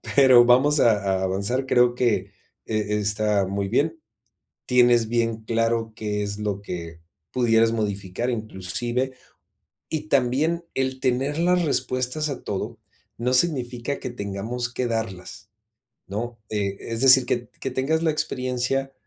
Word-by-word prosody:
pero 130 -3 +7
vamos 135 +5 +4
a 100 -5 +2
a - - -1
avanzar. 100 +8 -1
Creo 125 -1 +4
que 105 -6 0 0.3
e 105 -1 -1
está 105 -1 +1
muy 100 0 -2
bien, 160 +8 0 0.7
tienes 120 -2 +4
bien 115 -1 -1
claro 115 0 0
qué 105 -2 -2
es 100 0 -4
lo 100 -2 -3
que 85 -3 -7 0.3
pudieras 115 -2 +3
modificar 105 +1 -2
inclusive. 120 +4 -3 0.8
Y 155 -1 -4
también 145 +6 +1
el 130 0 -1
tener 130 +4 0
las 180 +1 +2
respuestas 135 +1 -1
a 140 - -5
todo, 105 +3 -4 0.4
no 125 +2 0
significa 130 -2 0
que 130 - -5
tengamos 120 +3 -4
que 125 0 -2
darlas, 105 -3 -5 0.6
¿no? 115 +4 -5
E 100 -2 -2
es 115 0 -4
decir, 130 -1 +8
que 120 -1 -2
que 135 - -3
tengas 135 +6 0
la 165 - +2
experiencia, 130 -1 -1
120 Hz, 140 wpm, -24 LUFS, 105-130 Hz, 0.8 s, decir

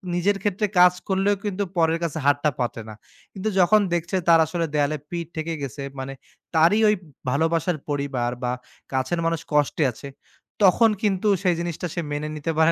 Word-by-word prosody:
নিজের 195 +3 +1
ক্ষেত্রে 205 +1 0
কাজ 180 0 +7
করলেও 195 +1 +2
কিন্তু 200 0 -1
পরের 165 0 +3
কাছে 160 -2 -2
হাতটা 145 +1 +3
পাতে 120 -1 -2
না। - - -8 0.4
কিন্তু 200 +3 -2
যখন 210 +4 +6
দেখছে 175 +2 -1
তার 165 -1 +7
আসলে 165 +1 -2
দেয়ালে 150 +1 +1
পিঠ 170 -1 -4
ঠেকে 160 +1 -3
গেছে 140 +1 -5 0.2
মানে 135 +1 -5 0.4
তারই 170 +7 +5
ঐ - - +6 0.4
ভালোবাসার 160 +4 +1
পরিবার 140 -4 -1
বা 125 - 0 0.4
কাছের 130 +6 0
মানুষ 165 -1 0
কষ্টে 150 +1 +2
আছে। 140 - -10 0.6
তখন 225 +5 +6
কিন্তু 200 0 +1 0.2
সেই 180 -2 +3
জিনিসটা 170 +1 -3
সে 170 - -2
মেনে 145 +1 -2
নিতে 155 +2 -2
পারে 160 +1 +5
165 Hz, 175 wpm, -24 LUFS, 145-180 Hz, 0.6 s, কাজ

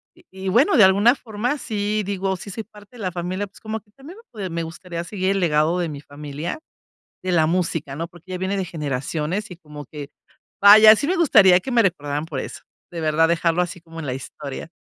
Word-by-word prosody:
y 350 +1 -22
y 190 0 -5
bueno, 265 - +4
de 220 - +8
alguna 200 +5 +6
forma 245 +3 -3
sí 210 -2 -2
digo, 195 -1 -1
sí 200 - -10
soy 220 +3 -5
parte 210 +2 -18
de 220 - -8
la 185 - -1
familia, 180 +3 -3
pues 195 - -18
como 220 0 -5
que 205 - -33
también 285 - -13 0.2
me 210 -4 -6
p 185 - -4
me 170 0 -3
gustaría 170 +1 -6
seguir 185 +1 -2
el 195 - +1
legado 160 -1 +2
de 170 - -1
mi 145 -2 -7
familia, 150 - -6 0.6
de 185 - -1
la 160 -3 +4
música, 165 -4 -1
¿no? 165 +3 -4
Porque 175 +2 -15
ya 185 - -3
viene 190 +2 -2
de 190 - -1
generaciones 155 +4 -3
y 180 - -9
como 150 -3 -11
que 145 0 -9 0.5
vaya, 215 +2 +10
sí 285 - -2
me 365 - +1
gustaría 200 - +6
que 265 - -5
me 240 -2 +4
recordaran 150 -5 -1
por 155 -5 -5
eso, - - -8 0.3
de 170 - -6
verdad 160 +1 +3
dejarlo 170 +1 +2
así 175 +1 -4
como 165 0 -11
en 150 - -6
la 125 - -2
historia. 135 +3 -8
180 Hz, 230 wpm, -22 LUFS, 160-205 Hz, 0.6 s, vaya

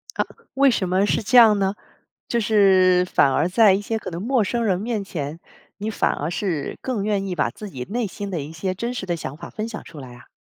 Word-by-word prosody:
啊， - - +1 0.3
为 275 0 +5
什 190 -6 -1
么 190 +2 +2
是 - - 0
这 245 +4 +1
样 220 -4 +8
呢？ 195 +1 0 0.5
就 235 - 0
是 190 -4 +4
反 135 - +4
而 165 - +1
在 205 +2 +5
一 195 - +1
些 220 +2 -3
可 185 - -7
能 170 +2 -5
陌 240 -1 +2
生 235 +3 -1
人 190 -3 +1
面 220 -2 -2
前， 160 -2 -5 0.4
你 215 +2 -3
反 - - +1
而 150 +4 -3
是 175 -5 -3
更 245 -6 -2
愿 200 -2 0
意 180 - -3
把 150 -7 0
自 210 - -9
己 130 -8 -7
内 235 -1 -1
心 200 +1 -6
的 170 -5 -2
一 150 +3 -7
些 185 +4 -3
真 235 +6 -4
实 190 - -5
的 175 -1 -1
想 145 -2 -6
法 - - -10
分 220 0 -4
享 215 - -7
出 160 -3 -12
来 125 -3 -10
啊？ 120 - -16
195 Hz, 270 characters per minute, -22 LUFS, 170-220 Hz, 0.5 s, 样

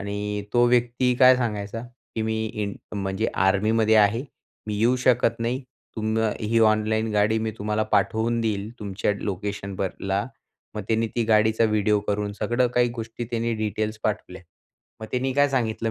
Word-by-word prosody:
आणि 105 0 -3
तो 120 0 +4
व्यक्ती 125 +1 +2
काय 130 0 +8
सांगायचा 115 -2 -3 0.3
की 110 - -1
मी 110 0 -1
इं 105 -2 -2 0.3
म्हणजे 95 +3 -1 0.2
आर्मीमध्ये 110 +3 +3
आहे. 110 +5 +3 0.4
मी 105 - -2
येऊ 120 +3 +3
शकत 120 -2 +2
नाही. 125 +4 -1 0.3
तुम्ही 110 +1 0
अ, 105 - +1
ही 115 +2 +1
ऑनलाईन 110 0 +2
गाडी 105 +2 +2
मी 110 0 -2
तुम्हाला 105 +1 0
पाठवून 110 +4 +1
देईल 105 -1 -2
तुमच्या 100 0 -1
लोकेशनवरला. 100 0 -3 0.5
मग 105 - -4
त्याने 115 0 +1
ती 115 - +2
गाडीचा 110 +1 +3
व्हिडिओ 105 -1 +2
करून 105 0 -1
सगळं 120 +4 0
काही 120 0 +4
गोष्टी 115 0 -5
त्याने 115 0 -1
डिटेल्स 110 0 -2
पाठवल्या. 100 -4 -3 0.6
मग 110 - -6
त्यानी 130 +1 0
काय 145 0 +4
सांगितलं 115 -3 -1
110 Hz, 160 wpm, -24 LUFS, 105-115 Hz, 0.6 s, काय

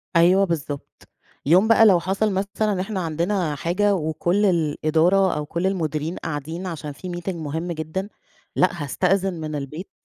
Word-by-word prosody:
أيوه 180 +4 +5
بالضبط، 150 -5 -5 0.4
يوم 180 +9 +5
بقى 225 0 +6
لو 190 -5 +6
حصل 195 +5 0
مثلًا 200 +3 -1
إن 190 - -2
إحنا 195 +1 -3
عندنا 170 0 -1
حاجة 195 +7 +1
وكل 175 +4 0
الإدارة 170 +2 +2
أو 150 - -3
كل 170 +5 -1
المديرين 160 -3 -2
قاعدين 160 +4 -5
عشان 155 -4 -5
في 180 +5 -7
meeting 185 +1 -3
مهم 160 +2 -4
جدًا، 165 +5 -4 0.5
لأ 175 -4 +1
هاستأذن 190 +6 +1
من 155 -2 -5
البيت 150 +6 -6
175 Hz, 155 wpm, -23 LUFS, 155-190 Hz, 0.5 s, بقى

